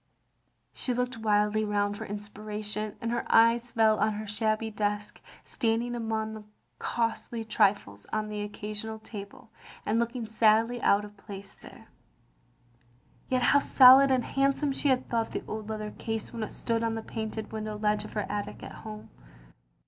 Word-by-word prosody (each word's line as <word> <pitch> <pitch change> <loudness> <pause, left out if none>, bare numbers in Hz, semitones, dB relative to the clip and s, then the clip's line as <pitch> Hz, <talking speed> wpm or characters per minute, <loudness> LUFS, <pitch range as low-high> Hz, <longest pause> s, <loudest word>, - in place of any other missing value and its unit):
She 250 - -2
looked 250 0 -1
wildly 210 0 +2
round 205 -1 0
for - - -6
inspiration, 210 +1 -5
and 230 - -2
her 240 - -1
eyes 230 +1 +5
fell 220 -2 +3
on 215 - +2
her 215 +1 -5
shabby 215 +1 -1
desk, 210 0 -2 0.2
standing 230 +1 -1
among 220 -2 -2
the 215 -1 -8 0.4
costly 230 0 -2
trifles 200 - +1
on 215 0 -1
the 210 -1 -4
occasional 210 +1 -5
table, 205 -2 -10 0.3
and 220 +2 +1
looking 235 0 -2
sadly 225 +2 +3
out 205 +1 +3
of 205 0 -13
place 200 -1 -9
there. - - -14 1.4
Yet 255 -1 +1
how 285 - +6
solid 270 0 +8
and 260 -2 +2
handsome 275 +1 +1
she 275 +1 0
had 255 -1 +2
thought 230 -1 -1
the - - -3
old 215 0 -5
leather 215 -1 -4
case 225 0 -4
when 230 - -5
it 215 - -3
stood 230 -1 -1
on 225 -1 0
the 225 - -4
painted 220 -1 -5
window 215 -1 -4
ledge 210 0 +1
of - - -10
her 210 -2 -1
attic 205 0 -4
at - - -7
home. 215 -1 -9
220 Hz, 165 wpm, -29 LUFS, 210-230 Hz, 1.4 s, solid